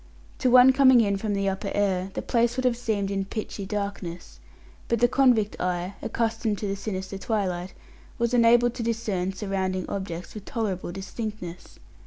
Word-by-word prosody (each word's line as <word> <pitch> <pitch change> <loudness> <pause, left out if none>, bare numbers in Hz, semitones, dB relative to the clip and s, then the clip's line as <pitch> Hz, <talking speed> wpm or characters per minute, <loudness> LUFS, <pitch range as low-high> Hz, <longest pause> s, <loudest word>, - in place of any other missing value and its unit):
To 255 - +2
one 250 +1 +8
coming 260 -2 +6
in 200 -3 +2
from 205 0 -2
the 200 0 0
upper 195 +1 -2
air, 190 -2 +1
the - - -3
place 235 0 +1
would 255 - -1
have 250 -2 +3
seemed 210 -4 -1
in 195 -1 -1
pitchy 200 -1 -5
darkness, 190 - -5 0.5
but 235 - +1
the 245 - +5
convict 245 -5 +2
eye, 180 +1 -1
accustomed 225 -2 -1
to 205 - -3
the 195 - -1
sinister 195 -1 -5
twilight, 190 -5 -2 0.4
was 235 0 0
enabled 240 0 +5
to - - -5
discern 220 -5 -1
surrounding 190 -2 -2
objects 180 -3 -5
with 210 -2 -9
tolerable 205 -9 -3
distinctness. 195 -2 -7
205 Hz, 170 wpm, -26 LUFS, 190-235 Hz, 0.5 s, one